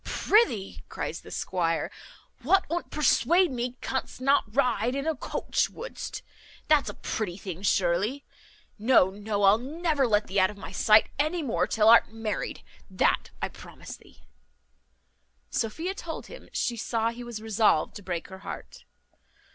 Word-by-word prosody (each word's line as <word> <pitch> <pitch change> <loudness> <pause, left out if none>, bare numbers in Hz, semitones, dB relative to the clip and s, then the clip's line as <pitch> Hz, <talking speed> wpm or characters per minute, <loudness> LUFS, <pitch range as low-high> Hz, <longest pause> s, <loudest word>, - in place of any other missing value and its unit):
"Prithee," 400 - +1
cries - - -4
the - - -13
squire, 165 -2 -1 0.5
"wout 385 -1 +4
unt 345 0 -2
persuade 345 +3 +3
me 245 0 -3
canst 265 - -3
not 275 +2 +3
ride 245 0 +1
in 275 +1 -2
a 320 -1 0
coach, - - -1
wouldst? - - -7 0.4
That's 300 -2 +3
a - - -7
pretty 190 -5 -3
thing 185 -3 -7
surely! 200 +8 +1 0.5
No, 215 -4 +4
no, 205 +1 -3
I'll 200 +3 +6
never 300 +1 0
let 210 -1 +2
thee 195 +1 0
out 185 0 +4
of 210 - -10
my 200 - -8
sight 215 0 +5
any 310 +3 0
more 180 -9 0
till 215 -1 +2
art 230 0 +7
married, 225 -1 -4 0.3
that - - +1
I - - 0
promise - - -11
thee." - - -21 1.3
Sophia 320 - -2
told 335 -4 -7
him, - - -12
she 240 -2 -1
saw 230 +1 0
he 240 +1 -8
was 240 -2 -6
resolved 215 -7 +2
to - - -11
break 175 -2 -4
her 190 0 -10
heart. - - -9
230 Hz, 155 wpm, -27 LUFS, 205-285 Hz, 1.3 s, art